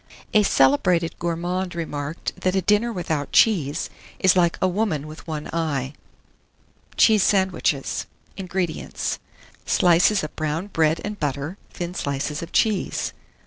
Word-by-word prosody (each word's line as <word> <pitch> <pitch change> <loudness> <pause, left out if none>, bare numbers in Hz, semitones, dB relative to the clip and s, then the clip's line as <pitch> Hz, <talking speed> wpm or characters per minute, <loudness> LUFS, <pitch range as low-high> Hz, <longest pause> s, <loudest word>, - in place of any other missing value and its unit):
A 215 - +6
celebrated 165 +1 +3
gourmand 175 +2 -2
remarked 155 -2 -4
that 185 0 +1
a 190 - +2
dinner 210 +5 +3
without 160 -7 -3
cheese 165 -8 +3 0.3
is 190 -1 +4
like 175 -2 +3
a 185 - +2
woman 180 -6 -1
with 155 +2 -11
one 155 -2 -4
eye. 145 -5 -1 1.0
CHEESE 215 -3 +6
SANDWICHES. 190 -8 +1 0.3
1641. 195 - -6
INGREDIENTS. 180 -2 -3 0.5
Slices 180 +3 +4
of 155 - -6
brown 155 +3 -2
bread 160 0 +2
and 210 0 -5
butter, 145 +5 -3
thin 175 0 -5
slices 145 -2 -2
of 170 - -7
cheese. 215 -4 0
170 Hz, 135 wpm, -23 LUFS, 150-190 Hz, 1.0 s, A